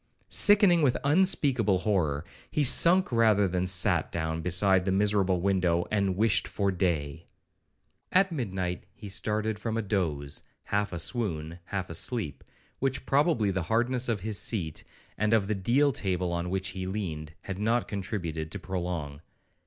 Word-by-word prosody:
Sickening 200 -4 +5
with 130 -4 +2
unspeakable 140 - +2
horror, 85 -7 -1 0.2
he 150 - 0
sunk 170 +7 +5
rather 110 -4 +3
than 90 0 -2
sat 90 -2 +3
down 80 0 -3
beside 90 +2 +3
the 95 - -1
miserable 95 -2 +2
window, 90 -3 +1
and 100 -3 0
'wished 110 0 +2
for 100 -1 -1
day.' 85 -4 -2 0.8
At 190 0 +3
midnight 95 - -4
he 105 - -10
started 105 +2 -2
from 115 +1 -3
a 115 - -1
doze, 80 -9 -2 0.2
half 105 0 -1
a 85 - -4
swoon, 85 -5 -3
half 95 -1 -4
a - - -8
sleep, 85 - -3 0.4
which 135 0 -2
probably 135 - +2
the 95 0 -2
hardness 120 +2 +1
of 110 -5 -1
his 105 0 -2
seat, 85 -9 -1 0.4
and 105 +2 +2
of 105 -3 +1
the 110 - -1
deal 120 +9 +2
table 90 -6 -2
on 85 +1 -3
which 95 +1 -2
he 95 -1 -5
leaned, 80 -6 -5
had 95 -1 -6
not 115 +3 0
contributed 90 -6 -4
to - - -5
prolong. 85 -6 -5
100 Hz, 160 wpm, -28 LUFS, 90-115 Hz, 0.8 s, Sickening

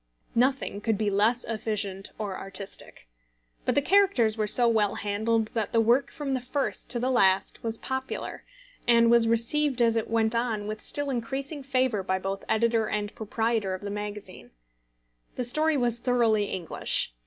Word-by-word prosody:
Nothing 250 -4 +1
could 220 -1 0
be 210 -1 0
less 220 +5 +2
efficient 210 -3 -3
or 205 -3 -4
artistic. 195 - -5 0.6
But - - +1
the 285 - +2
characters 370 - +3
were 215 -1 -1
so 240 +3 +5
well 215 -3 +2
handled, 220 +2 0
that 220 -3 -3
the 230 - +4
work 245 +5 +3
from 285 -2 -4
the 260 - -1
first 275 +3 -2
to 240 - +1
the 255 +2 0
last 195 -5 +2
was 225 -1 -3
popular, 265 +2 -5 0.4
and 235 -1 +5
was 235 -1 +5
received 250 +5 +1
as 230 -1 +3
it 225 - -1
went 225 0 +2
on 230 -3 -1
with 215 +1 -5
still 290 -1 -1
increasing 270 +5 -3
favour 255 -5 0
by 190 0 -1
both 195 +1 -4
editor 225 0 +2
and 210 -1 -3
proprietor 220 -2 -1
of 185 - -10
the 200 - -4
magazine. 205 -2 -7 0.9
The 250 - -2
story 305 +5 +2
was 240 -2 +1
thoroughly 235 -4 +2
English. 170 - -1
230 Hz, 170 wpm, -27 LUFS, 210-250 Hz, 0.9 s, so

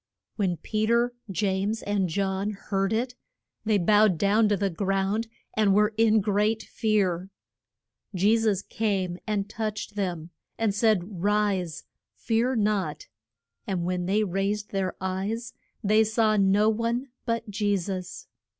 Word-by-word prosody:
When 185 -5 0
Pe 215 +6 -1
ter, 235 +1 +2 0.2
James, 200 +3 -1
and 200 -3 0
John 195 +3 -1
heard 195 -1 -2
it, 240 +3 -1 0.5
they 215 -1 +3
bowed 205 0 +4
down 210 +4 +3
to 205 - +2
the 195 0 0
ground, 195 +4 0 0.3
and 205 -3 +3
were 210 +1 +3
in 220 -1 +4
great 210 +2 +1
fear. 195 -5 0 0.9
Je 200 +5 +4
sus 215 -4 +1
came 190 -5 -1
and 205 -2 -1
touched 215 -1 -4
them, 175 -5 -3 0.3
and 225 -3 +1
said, 200 -4 +1
Rise. 200 -5 0 0.3
Fear 235 +3 0
not. 200 -8 -1 0.6
And 180 -3 -1
when 180 0 -1
they 210 +3 +2
raised 200 +2 -2
their 190 -2 -1
eyes 195 +5 -3 0.3
they 215 +2 +4
saw 220 0 +2
no 200 +1 +4
one 230 +4 0 0.2
but 230 0 -1
Je 205 0 +1
sus. 185 0 -5
205 Hz, 140 wpm, -26 LUFS, 190-220 Hz, 0.9 s, bowed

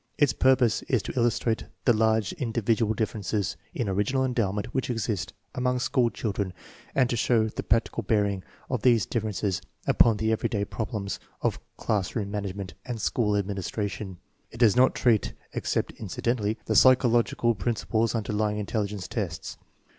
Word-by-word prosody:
Its 145 -3 +4
purpose 130 -4 +3
is - - +2
to - - -5
illustrate 120 -2 +1 0.2
the 120 - +6
large 110 - +2
individual 115 - 0
differences 105 -2 -1 0.2
in 115 - -2
original 105 +8 +1
endowment 105 -5 0
which 130 -1 -1
exist 110 -6 -2 0.2
among 125 0 0
school 125 -1 +2
children 100 -5 -3 0.4
and 130 -2 +4
to 120 - -1
show 115 -1 +2
the 110 - -4
practical 115 +2 +1
bearing 100 -4 +1 0.3
of 125 -4 -2
these 120 -4 +4
differences 105 -5 -1 0.2
upon 115 -3 +4
the 110 +1 0
everyday 105 -2 0
problems 105 -3 -4 0.2
of - - 0 0.2
class 100 -4 -1
room 100 -4 -2
management 100 -3 -4
and 120 -3 -5
school 105 -1 +1
administration. 100 0 -3 0.3
It - - -12
does 115 -4 +5
not 130 +1 +5
treat, 115 -4 +2 0.2
except - - -1
incidentally, 115 -2 -1
the - - 0
psychological 120 -2 +4
prin 110 +3 -1
ciples 115 +1 0
underlying 105 -1 0
intelligence 105 -2 -2
tests. - - -4
110 Hz, 150 wpm, -27 LUFS, 105-120 Hz, 0.4 s, the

